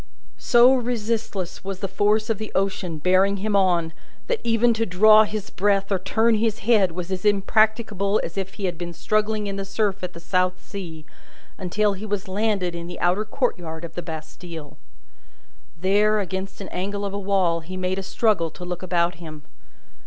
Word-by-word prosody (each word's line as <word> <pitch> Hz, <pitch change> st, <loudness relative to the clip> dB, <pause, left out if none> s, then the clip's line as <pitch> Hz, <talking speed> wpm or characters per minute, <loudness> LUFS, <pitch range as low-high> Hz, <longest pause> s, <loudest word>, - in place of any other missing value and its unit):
So 240 Hz, -, +6 dB
resistless 225 Hz, -6 st, -2 dB
was 195 Hz, 0 st, -4 dB
the 195 Hz, -, -3 dB
force 210 Hz, +3 st, +1 dB
of 220 Hz, -, -2 dB
the 215 Hz, -, -6 dB
ocean 190 Hz, -4 st, -1 dB
bearing 185 Hz, +5 st, +3 dB
him 205 Hz, +1 st, -1 dB
on, 175 Hz, -4 st, +2 dB, 0.3 s
that 485 Hz, -2 st, -1 dB
even 235 Hz, 0 st, +3 dB
to 225 Hz, 0 st, 0 dB
draw 215 Hz, +4 st, +6 dB
his 210 Hz, -1 st, -5 dB
breath 195 Hz, 0 st, +1 dB
or 195 Hz, -, +2 dB
turn 225 Hz, +4 st, +2 dB
his 220 Hz, 0 st, +1 dB
head 205 Hz, -7 st, +4 dB
was 180 Hz, +1 st, -5 dB
as 185 Hz, -1 st, -3 dB
impracticable 210 Hz, 0 st, +2 dB
as 165 Hz, -, -5 dB
if 190 Hz, -1 st, -4 dB
he 200 Hz, -, -3 dB
had 175 Hz, -3 st, -3 dB
been 175 Hz, -1 st, -5 dB
struggling 215 Hz, +2 st, 0 dB
in 200 Hz, -1 st, -4 dB
the 195 Hz, -, -3 dB
surf 195 Hz, 0 st, -1 dB
at 180 Hz, -1 st, -4 dB
the 170 Hz, -, -9 dB
South 185 Hz, +1 st, 0 dB
Sea, 165 Hz, -6 st, -8 dB, 0.5 s
until 205 Hz, +3 st, +1 dB
he 200 Hz, +3 st, -7 dB
was 205 Hz, -1 st, -3 dB
landed 195 Hz, -2 st, 0 dB
in 170 Hz, 0 st, -6 dB
the 175 Hz, -, -7 dB
outer 180 Hz, +5 st, +1 dB
courtyard 175 Hz, -, -2 dB
of 165 Hz, -, -10 dB
the 175 Hz, -, -4 dB
Bastille. 160 Hz, -1 st, -8 dB, 1.0 s
There, 205 Hz, +4 st, +3 dB
against 190 Hz, +1 st, -4 dB
an 195 Hz, -, -7 dB
angle 200 Hz, +2 st, -3 dB
of 200 Hz, -, -4 dB
a 200 Hz, -, -2 dB
wall, 190 Hz, -4 st, +1 dB
he 180 Hz, +3 st, -8 dB
made 185 Hz, +1 st, -1 dB
a -, -, -3 dB
struggle 195 Hz, -3 st, +1 dB
to 180 Hz, +3 st, -10 dB
look 180 Hz, 0 st, -4 dB
about 175 Hz, -1 st, 0 dB
him. 155 Hz, -3 st, -9 dB
195 Hz, 190 wpm, -23 LUFS, 180-215 Hz, 1.0 s, So